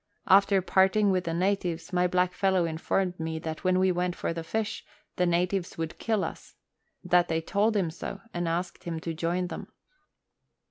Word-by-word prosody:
After 195 0 +5
parting 195 +2 +3
with 185 -1 0
the 165 - -2
natives, 180 -2 -1
my 180 0 +3
blackfellow 180 0 +2
informed 180 +3 -1
me 160 0 -3
that 160 -1 -5
when 185 -1 +3
we 185 0 +3
went 180 0 -1
for - - -2
the 165 -1 -5
fish 215 +5 -3 0.3
the 180 - +2
natives 180 +2 0
would 165 0 -4
kill 220 -4 0
us; - - -7 0.5
that 180 -1 +3
they 160 0 0
told 205 +6 +1
him 175 -5 0
so, 190 +3 -6
and 175 -1 -2
asked 175 +2 -3
him 165 -2 -3
to 165 - -3
join 170 +3 -1
them. 180 - -6
180 Hz, 180 wpm, -28 LUFS, 170-190 Hz, 0.5 s, After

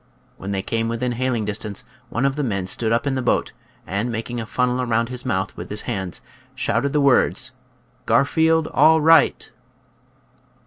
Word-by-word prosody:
When 100 - -6
they 95 -1 -2
came 115 0 -1
within 120 +2 -2
hailing 120 -2 -1
distance 105 0 -3 0.3
one 125 +4 -1
of 135 0 +1
the 150 - -2
men 100 -7 -1
stood 110 +4 -1
up 115 +4 +1
in 140 - 0
the 130 - -1
boat, - - 0 0.3
and 105 +5 -2
making 115 +1 -4
a 110 - -7
funnel 125 +1 0
around 115 -1 0
his 125 0 -5
mouth 95 -5 -1
with - - -8
his 105 +1 -3
hands, 95 -7 -4 0.3
shouted 130 +5 0
the 150 - +1
words, 135 -1 +3 0.3
" 125 +1 -38
Garfield 160 +3 +3
all 160 0 +5
right." 160 -1 +4
120 Hz, 180 wpm, -22 LUFS, 110-135 Hz, 0.3 s, all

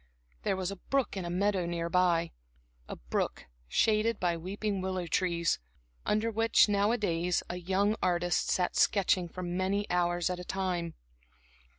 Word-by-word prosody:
There - - 0
was 190 0 -2
a 200 - -6
brook 270 +6 -1
in 190 -2 -4
a - - -3
meadow 185 0 +1
near 170 -1 -2
by; 170 -1 +2 0.6
a - - -4
brook - - -3 0.2
shaded 220 - +2
by 175 -2 +1
weeping 195 +3 -3
willow 185 -1 -2
trees, 170 0 +1 0.5
under 215 +2 +1
which 225 +1 +4
nowadays 200 -4 +1
a 175 - -4
young 195 +4 +1
artist 175 -1 +1
sat 180 -1 +1
sketching 185 -3 +2
for 180 +2 -7
many 185 +3 -1
hours 175 0 +1
at 180 - -4
a - - -6
time. 180 -3 -2
185 Hz, 155 wpm, -30 LUFS, 175-200 Hz, 0.6 s, which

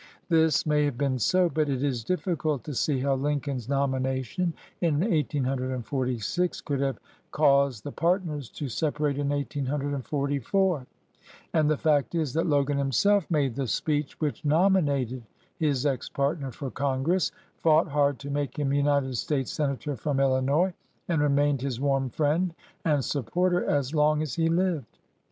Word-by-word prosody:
This 160 -2 +3
may 150 -1 +2
have 140 -4 -2
been 135 -2 0
so, 185 +4 +3
but 155 -3 0
it 135 -1 -1
is 130 -5 -1
difficult 160 - -1
to 150 - -6
see 135 +1 0
how 140 0 +2
Lincoln's 135 -3 -2
nomination 135 +4 -1 0.3
in 165 -4 +2
1846 135 - -1
could 140 -3 -2
have 135 -3 0 0.3
caused 140 -6 +3
the 145 - -5
partners 165 - -1
to 145 - -5
separate 145 +2 -1
in 140 -1 0
1844, 145 - -1 0.7
and 155 -2 +3
the 155 - +2
fact 150 +1 +1
is 155 -6 -1
that 165 +2 +1
Logan 145 -2 +2
himself 170 - +2
made 145 -7 +1
the 135 +1 -2
speech 150 +4 -1
which 150 -3 -2
nominated 145 - +2 0.4
his 145 -4 +1
ex 135 -4 -1
partner 140 0 -1
for 130 +2 -6
Congress, 140 +7 0 0.3
fought 160 +1 +4
hard 145 -1 +2
to 140 0 -7
make 145 +1 -2
him 140 -2 0
United 140 -2 +1
States 135 +1 -1
senator 145 -1 -2
from 135 +3 -1
Illinois, 135 +7 +2 0.3
and 165 -4 +1
remained 145 -1 +2
his 130 -3 -3
warm 135 -1 +1
friend 160 +6 0 0.3
and 145 -5 +1
sup 140 -6 -2
porter 180 0 +2
as 140 0 0
long 150 0 +3
as 150 -6 -4
he 165 +2 +1
lived. 170 -6 -1
145 Hz, 155 wpm, -27 LUFS, 135-155 Hz, 0.7 s, fought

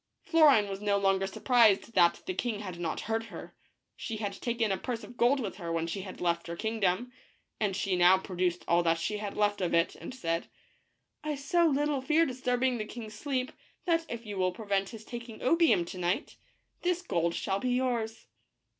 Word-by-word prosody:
Florine 290 -11 +5
was 195 0 -5
no 205 -1 +2
longer 195 -1 +2
surprised 230 +1 +3
that 175 -4 +4
the 370 - -2
king 230 - -2
had 185 -4 -7
not 170 -2 -2
heard 225 +1 -2
her. - - -10 0.4
She 225 -3 -5
had 205 -2 -3
taken 230 0 -1
a 190 - +1
purse 235 +3 -4
of 245 - -11
gold 250 +4 +3
with 205 -7 -4
her 170 -3 -5
when 165 0 0
she 185 +3 -4
left 175 -3 -2
her 170 - -4
kingdom, 220 +2 0 0.5
and 205 -3 0
she 195 -1 0
now 180 +1 +6
produced 180 -2 -2
all 170 +1 +4
that 165 -1 +2
she 210 +6 -2
had 205 -1 -5
left 205 -1 +1
of 175 -2 +1
it, 170 +1 +2
and - - -8
said, 165 -9 -2 0.4
" - - -48
I 305 -1 -2
so 330 +5 +2
little 290 -1 +1
fear 315 +5 +3
disturbing 255 -2 0
the 215 - -2
king's 220 -1 -8
sleep 255 +3 -2 0.3
that 330 -2 +1
if 235 0 -6
you 205 -2 -6
will 185 0 +2
prevent 195 -1 -1
his 220 -1 -10
taking 235 -2 -8
opium 325 - +4
to 185 - -8
night, 175 +1 -1 0.5
this 360 0 0
gold 170 - 0
shall 195 0 -1
be 255 - -1
yours." 235 -3 -1
215 Hz, 200 wpm, -30 LUFS, 185-250 Hz, 0.5 s, now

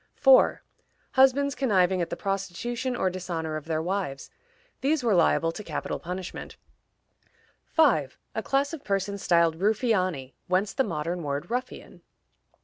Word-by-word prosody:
4. - - +5 0.5
Husbands 270 +1 +4
conniving 190 -9 +2
at 170 - -2
the - - -3
prostitution 215 +6 -3
or 190 -6 0
dishonor 170 -4 -4
of 155 -1 -5
their 160 -1 -1
wives: 180 -7 -3 0.5
these 285 0 +1
were 230 -3 +2
liable 165 -1 +3
to 210 - -8
capital - - -4
punishment. 180 +1 -6 1.2
5. 210 - +3 0.2
A 220 - -2
class 275 +5 0
of 320 - -7
persons 200 0 -2
styled 170 -2 +3
Ruffiani 185 - 0
(whence 190 +3 +1
the 265 - +2
modern 170 -3 -3
word 145 +5 -4
ruffian). 250 +1 -5
190 Hz, 140 wpm, -27 LUFS, 170-245 Hz, 1.2 s, 4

